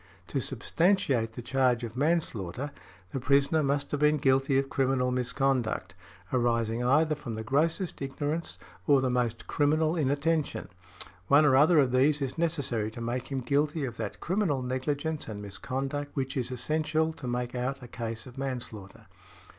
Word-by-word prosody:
"To 135 - -1
substantiate 135 - +1
the 120 - -7
charge 125 -2 +2
of 115 -1 -5
manslaughter, 140 - -1 0.4
the 135 - -2
prisoner 140 +4 +3
must 140 0 0
have 145 - -1
been 150 +1 +4
guilty 135 0 +3
of 135 0 +1
criminal 130 -2 +1
misconduct, 125 -6 0 0.4
arising 115 -1 +1
either 155 +5 +3
from 135 -7 -5
the 110 - -4
grossest 160 - 0
ignorance, 145 +4 -3 0.3
or 140 -2 +6
the 130 -1 +1
most 120 -2 -1
criminal 155 +2 +2
inattention; 150 +1 0 0.6
one 145 +2 +6
or 130 -3 +5
other 155 +5 +6
of 135 -4 +4
these 140 +4 +3
is 135 -2 -3
necessary 145 -10 -1
to 110 - -10
make 120 +2 -3
him 135 -1 -1
guilty 145 +3 +1
of 120 - -6
that - - -5
criminal 170 -8 0
negligence 145 +5 -2
and 105 -2 -6
misconduct 135 +7 -4
which 135 -1 -2
is 130 -2 -1
essential 155 +5 0
to 135 - -8
make 120 0 -2
out 125 +2 -3
a - - -8
case 115 -1 -5
of 130 0 -11
manslaughter." 120 -7 -6
135 Hz, 160 wpm, -29 LUFS, 125-150 Hz, 0.6 s, or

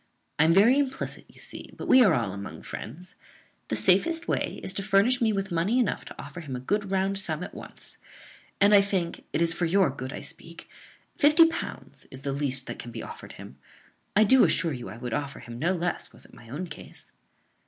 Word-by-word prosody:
I 155 - +6
am 165 - +5
very 235 +8 +6
implicit, 270 -2 -2
you - - -21
see; - - -9
but - - -6
we 260 - +7
are 190 -8 +5
all 115 -6 -1
among 100 0 -8
friends. 165 +12 -8 0.5
The - - -1
safest 335 0 +3
way - - -1
is 185 - -1
to - - -2
furnish 210 +6 +3
me 225 -2 +3
with 195 -2 -2
money 175 +8 +1
enough 245 -6 0
to - - -11
offer 180 - -8
him 140 -5 -6
a - - -4
good 200 +10 -1
round 195 0 0
sum 165 -3 -1
at - - -8
once; - - -8 0.6
and 200 +1 +5
I 200 - +8
think 190 -4 -2
(it 165 - +2
is 165 -1 +2
for 175 - -1
your 180 -2 +3
good 130 -1 -6
I - - -6
speak) 165 0 -10 0.5
fifty 300 +3 +7
pounds 325 - -5
is 130 - -10
the 140 0 -2
least 135 -2 -2
than - - -7
can 120 - -7
be 115 -1 -6
offered - - -9
him. 70 - -12 0.6
I 210 - +7
do 255 +5 +6
assure 165 -4 +2
you 120 -2 -6
I 105 - -9
would 120 -1 -5
offer 140 -1 -3
him 120 0 -9
no 170 +6 +1
less 175 -1 -3
was - - -8
it - - -19
my 115 - -15
own 150 +9 -4
case." 175 - -10
175 Hz, 225 wpm, -27 LUFS, 140-205 Hz, 0.6 s, I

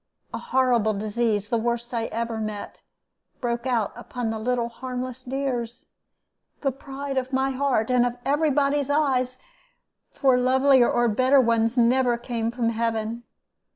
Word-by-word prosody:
A - - -3
horrible 240 -5 +2
disease, 210 0 -1
the 235 -1 +1
worst 235 +1 -2
I 230 -1 -1
ever 230 0 -3
met, 215 -1 -5 0.6
broke 235 0 -2
out 230 -5 0
upon 240 -1 -4
the 220 - -4
little 240 +1 0
harmless 255 +1 -6
dears, 255 -3 -4 0.7
the 275 - +1
pride 275 0 -4
of 260 +1 -7
my 265 0 +1
heart 260 -4 0
and 250 -1 +4
of 245 0 -1
every 295 +3 +2
body's 285 0 +1
eyes, 260 -4 +1 0.7
for 260 -3 +3
lovelier 260 0 +4
or 240 0 +2
better 255 +5 +4
ones 230 0 +2
never 245 0 +3
came 235 -1 -3
from 235 -1 -1
heaven. 230 0 -2
245 Hz, 150 wpm, -24 LUFS, 230-265 Hz, 0.7 s, and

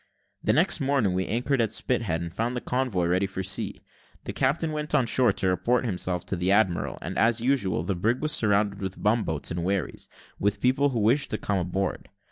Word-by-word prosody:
The - - +2
next - - +3
morning 135 -8 +1
we 95 +1 -1
anchored 125 +4 0
at 110 -2 0
Spithead, 110 -9 -1
and 85 -1 -6
found 120 +5 -2
the - - -1
convoy 125 -9 -1
ready 90 +3 +1
for 95 -1 -5
sea. 95 - -2 0.4
The - - -5
captain 155 +4 0
went 150 0 -2
on 135 -4 +3
shore 120 0 +3
to 95 - -1
report 120 +7 +1
himself 90 -4 -2
to - - -2
the 90 +2 0
admiral, 100 -4 +1
and, - - -3
as 115 +2 +3
usual, 115 - +1
the 95 - -1
brig 110 +8 0
was 155 0 -1
surrounded 100 -3 +2
with 95 0 -5
bum 110 +2 +2
boats 80 -2 -2
and 85 0 -2
wherries, 95 -4 -2 0.3
with 100 +1 0
people 135 +3 +2
who 125 -4 -2
wished 120 +7 +2
to 110 - -1
come 100 -2 -1
on 90 0 -3
board. 95 0 -3
105 Hz, 220 wpm, -26 LUFS, 95-125 Hz, 0.4 s, next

